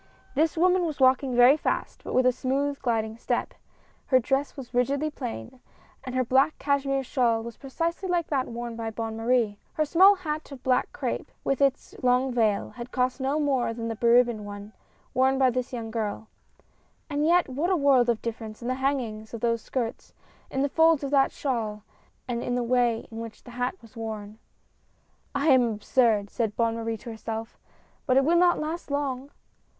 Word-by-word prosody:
This 315 +3 +1
woman 365 +2 +4
was 315 -4 -3
walking 260 0 +3
very 245 +3 +7
fast, 310 - -3
but - - -4
with 255 - +4
a 255 - +6
smooth, 275 +3 -1
gliding 225 -3 -1
step. - - -2 0.5
Her 260 - +5
dress 270 +4 -1
was 260 -2 -9
rigidly 275 +5 +1
plain; 110 - -7 0.4
and 255 -1 -6
her 255 - +2
black 265 +5 +3
cashmere 275 -1 0
shawl 235 -3 +1
was 235 -1 -7
precisely 335 +7 -3
like 350 -2 +1
that 270 -3 0
worn 235 0 -5
by 225 -1 -4
Bonne 225 0 -4
Marie. 225 -2 +1
Her 310 - +1
small 375 +7 +6
hat 310 -5 -5
of 270 -2 -10
black 255 -1 +1
crape, - - -3
with 275 0 0
its 275 -1 +1
long 250 0 +2
vail, 220 -4 +1
had 245 0 -9
cost 255 +1 0
no 275 +3 0
more 265 -6 0
than 230 0 -4
the 225 - -3
beribboned 235 -1 +3
one, 205 +1 -9 0.4
worn 265 +1 +3
by 260 -1 +4
the 255 +1 0
young 230 -3 -5
girl; 220 -1 -3 0.8
and 290 -1 -1
yet 345 +3 +4
what 285 +7 -1
a 375 - +3
world 270 -5 +4
of 230 -2 0
dif 230 -1 -3
ference 215 -2 -8
in - - -4
the - - +1
hanging 235 -6 -1
of 230 - -6
those 230 -1 +1
skirts, 235 -2 -4 0.3
in 265 - -1
the - - +2
folds 320 -1 +4
of 280 - -3
that 275 -2 +4
shawl, 220 -6 -3 0.4
and 240 -1 -2
in 245 - -2
the 245 - 0
way 240 -1 +1
in 225 - -7
which 230 -1 -8
the 245 - -12
hat 245 +5 -2
was 225 - -17
worn. 220 -1 -6 1.0
"I 280 +3 +2
am 260 -2 +7
absurd," 215 -1 +1
said 225 -4 -1
Bonne 230 -1 +1
Marie 225 0 -3
to 235 - -9
herself, 225 0 -6 0.5
"but 255 -1 +4
it 270 - +4
will 335 +3 +3
not 350 0 +4
last 315 +2 -4
long 280 -2 -2
255 Hz, 195 wpm, -26 LUFS, 230-280 Hz, 1.0 s, very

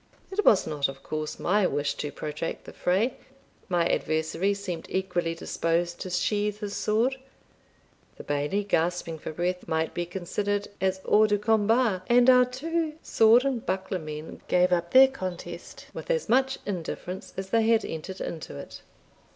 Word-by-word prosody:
It 415 +2 0
was 200 - +5
not, 145 -2 0
of 135 0 -9
course, 155 0 -4
my 200 +1 +2
wish 145 0 -1
to 145 - -3
protract 150 +2 -5
the - - -11
fray 205 +8 +1 0.5
my 175 -2 +2
adversary 160 +6 0
seemed 185 -5 -5
equally 175 -3 -1
disposed 170 +1 -1
to 185 - -5
sheathe 205 +3 0
his 205 -1 -5
sword 235 +5 +1 1.0
the - - -10
Bailie, 145 +8 -1
gasping 170 -3 -1
for - - -6
breath, 180 +3 -2
might 160 0 -1
be 175 0 -3
considered 200 +3 -2
as 190 0 0
hors 215 +1 +5
de 205 - +3
combat, 220 -1 +2
and 245 +1 +6
our 250 0 +6
two 310 +5 -2
sword 225 +4 +5
and 260 -4 -1
buckler 190 0 -2
men 155 0 -8
gave 180 0 +3
up 170 -1 0
their 265 +7 +8
contest 180 -8 -7
with - - -8
as 485 -1 0
much 265 +2 +2
indifference 185 0 -5
as 190 0 -5
they 225 -1 +3
had 225 -1 +3
entered 170 +4 -6
into 160 -2 -6
it. - - -9
190 Hz, 165 wpm, -27 LUFS, 170-220 Hz, 1.0 s, their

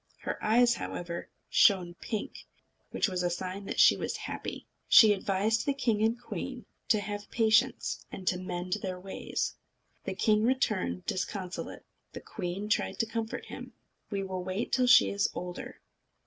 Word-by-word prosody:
Her - - -4
eyes, 240 +2 +5
however, 175 -6 -5 0.2
shone 180 -3 +4
pink, 210 +4 -6 0.4
which - - +1
was 185 -2 -2
a 175 - +1
sign 185 +3 -4
that - - -4
she - - +8
was - - -3
happy. - - -6 0.2
She 215 -2 +9
advised 200 +3 0
the 280 - 0
king 225 -6 +1
and 225 +2 +2
queen 245 - -6 0.2
to 215 - +4
have 205 0 -5
patience, 230 +3 +2
and 190 - -8
to 180 - +2
mend 180 +1 -3
their 185 -1 -4
ways. 190 +1 -3 0.5
The - - -3
king 215 -2 +3
returned 155 - 0
disconsolate. 185 -1 -4 0.3
The - - -6
queen 190 +1 -5
tried 210 - 0
to 225 - +1
comfort 225 0 -4
him. - - -9 0.4
"We 200 -2 -2
will 185 -1 -4
wait 185 +5 -3
till 255 -1 +3
she 250 - +7
is 200 0 +1
older. 180 0 -6
200 Hz, 160 wpm, -30 LUFS, 185-225 Hz, 0.5 s, She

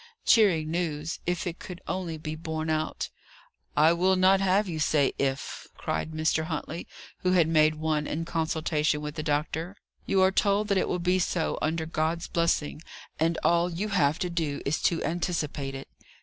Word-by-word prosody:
Cheering 170 -9 +4
news, 165 -2 -2
if 175 -1 -1
it 175 -1 -4
could 180 -1 -8
only 175 -4 -3
be 155 0 -5
borne 160 0 -3
out. 155 0 -2 0.7
"I 155 +3 +6
will 185 +2 +3
not 190 +1 +5
have 195 +2 +3
you 165 -3 -4
say 150 -2 +2
'If,'" 135 0 -2
cried - - -2
Mr. 160 0 0
Huntley, 160 +1 -5 0.3
who 185 0 +1
had 170 -4 +4
made 155 -1 +4
one 155 -1 -1
in 165 +2 -3
consultation 160 -2 0
with 150 0 -5
the 155 - -4
doctor. 160 +5 -2 0.3
"You 190 -1 +3
are 190 - +5
told 205 +2 +2
that 200 - +3
it - - 0
will - - 0
be 180 +1 +1
so, 175 -2 0
under 160 +1 0
God's 160 +2 -1
blessing, 165 -3 0 0.4
and 165 +1 +2
all 170 +1 +3
you 195 +6 -3
have 155 -6 +2
to - - -2
do 160 -4 -1
is 145 +3 0
to 170 - +1
anticipate 155 -5 -2
it." 135 - -7
165 Hz, 180 wpm, -27 LUFS, 155-180 Hz, 0.7 s, I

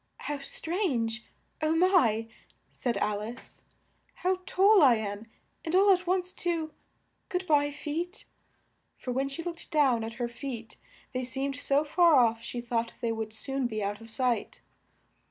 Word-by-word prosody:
"How 290 -1 -3
strange! 275 - -2 0.3
Oh 310 +1 +2
my!" 325 - +3 0.4
said 240 -5 -2
Al 205 0 0
ice, 235 +4 -8 0.5
"how 370 0 0
tall 390 +1 +5
I 260 -5 +7
am, 210 0 -4 0.4
and 330 +1 -1
all 395 +1 +6
at 365 -1 -2
once, 365 0 +1
too! 330 -3 -2 0.6
Good 360 +1 -2
by, 290 -3 +3
feet." 325 +6 -4 0.7
(For 250 - -5
when 270 +2 0
she 275 +5 -6
looked 340 -1 -6
down 270 -8 +3
at 225 +1 -5
her 240 0 -2
feet 235 -2 -7 0.4
they 255 0 -1
seemed 270 +2 -2
so 285 +1 +2
far 335 +1 +5
off, 230 -3 +4
she 240 +1 -5
thought 235 -1 -2
they 235 - -1
would 220 -1 -3
soon 270 +3 -2
be 215 -3 -3
out 205 +2 -3
of 225 - -12
sight.) 245 0 -1
270 Hz, 160 wpm, -29 LUFS, 230-335 Hz, 0.7 s, I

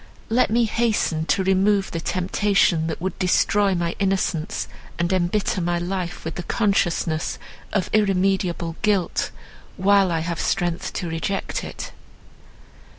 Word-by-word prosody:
Let 240 +3 +3
me 235 +2 +3
hasten 210 -8 0
to 190 - +2
remove 195 +1 +2
the 165 - -3
temptation, 185 -1 +1
that 160 - -3
would 190 +2 -4
destroy 195 +1 +3
my 170 -1 -1
innocence, 190 -2 0 0.3
and 175 +1 0
embitter 185 +1 0
my 175 0 0
life 180 0 -4
with 160 - -3
the 180 - -4
consciousness 175 -5 0 0.3
of 195 -4 0
irremediable 190 -4 +1
guilt, 205 -4 +1 0.5
while 195 -1 +4
I 165 -1 0
have 170 0 -3
strength 175 -1 -1
to 175 - -3
reject 165 +4 -2
it." - - -7
185 Hz, 135 wpm, -23 LUFS, 170-200 Hz, 0.5 s, while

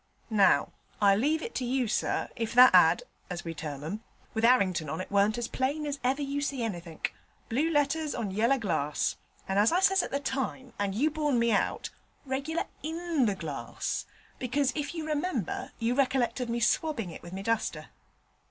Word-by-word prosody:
Now, 205 -3 +4 0.3
I 200 -1 +5
leave 300 +9 +1
it 460 - -5
to - - -2
you, 250 0 0
sir, 215 - 0
if 230 -1 -3
that 250 +1 +9
ad., - - +6 0.3
as 175 -2 -5
we 165 - -3
term 150 -3 -6
'em, 205 +8 -5 0.3
with 220 - -2
'Arrington 190 - +3
on 160 - -3
it 185 - -6
warn't 205 +2 +3
as 240 -1 -2
plain 280 +5 -1
as 285 -1 -3
ever 270 +3 +1
you 280 +1 -2
see 275 -4 -2
anythink 175 -7 -4 0.4
blue 280 +8 +1
letters 300 0 +1
on 210 -4 -3
yeller 230 +7 +2
glass, 160 - -1 0.3
and 195 +1 +1
as 210 +6 +5
I 350 - +3
says 385 0 +4
at - - -4
the 280 - -1
time, 265 -2 -3
and 200 -1 -1
you 295 +8 +2
borne 295 -4 +1
me 235 0 +3
out, 205 - 0 0.3
reg'lar 280 +5 -2 0.2
in 325 -4 0
the 205 - 0
glass, 155 -6 -4 0.3
because, 260 +2 +1
if 295 +3 -3
you 320 -2 -3
remember, 300 - -2
you 230 +1 0
recollect 255 -3 +1
of 250 -2 -3
me 235 +1 -1
swabbing 235 - +1
it - - -9
with 175 +1 -10
my 195 +1 -5
duster.' 230 +1 -1
245 Hz, 195 wpm, -29 LUFS, 200-285 Hz, 0.4 s, that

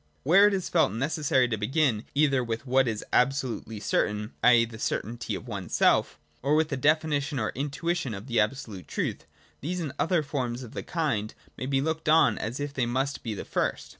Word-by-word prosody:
Where 195 +8 +6
it 210 - +1
is 185 - -2
felt 165 - +3
necessary 135 +2 +1
to 110 - -1
begin 125 -1 +1
either 140 -3 +3
with 115 +2 -4
what 130 0 +3
is 110 -2 -3
absolutely 125 -4 0
certain, 105 +1 -1
i.e. 120 -1 +6
the 110 -1 -11
certainty 120 +1 -3
of - - -8
oneself, 100 -6 +1 0.2
or 140 +3 +2
with 155 0 +2
a - - 0
definition 150 0 +1
or 110 -3 -1
intuition 145 -1 -2
of 100 +2 -8
the 120 -4 0
absolute 105 -4 -2
truth, - - -3 0.3
these 180 +6 -3
and 155 -6 -4
other 165 -1 +2
forms 130 -3 -3
of 115 - -11
the - - -4
kind 125 -11 -2 0.2
may 130 - -5
be 135 -1 +1
looked 160 +1 -2
on 160 +1 +5
as 115 +5 -4
if 145 0 -4
they 125 -4 0
must 135 +3 -1
be 110 -3 -4
the - - -6
first. - - -2
135 Hz, 195 wpm, -27 LUFS, 115-150 Hz, 0.3 s, Where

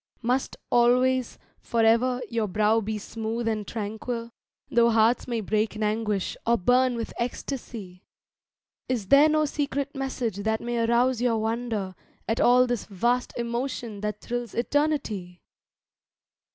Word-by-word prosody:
Must 250 +3 0
always—for 245 -1 +1
ever, 245 +3 +3
your 230 -2 -1
brow 215 +3 +2
be 215 +1 -3
smooth 225 +2 -4
and 215 -2 -1
tranquil, 230 +2 -4 0.4
Though 235 0 +5
hearts 225 +1 +3
may 235 -2 -1
break 215 +1 0
in 215 - -3
anguish, 210 -2 -1
or 235 0 +4
burn 250 +5 +3
with 230 -1 -4
ecstasy? 230 -6 -5 0.9
Is 230 -7 -2
there 285 +2 +7
no 310 0 +3
secret 280 -1 -2
message 260 -6 -3
that 220 +2 0
may 240 0 -2
arouse 240 +1 +2
your 240 -2 +2
wonder 220 -3 -2 0.3
At 225 - 0
all 250 +1 +6
this 245 -4 -2
vast 240 +5 -1
emotion 235 -2 -3
that 210 0 -3
thrills 240 -2 -4
Eternity? 235 -10 -1
235 Hz, 135 wpm, -26 LUFS, 220-250 Hz, 0.9 s, there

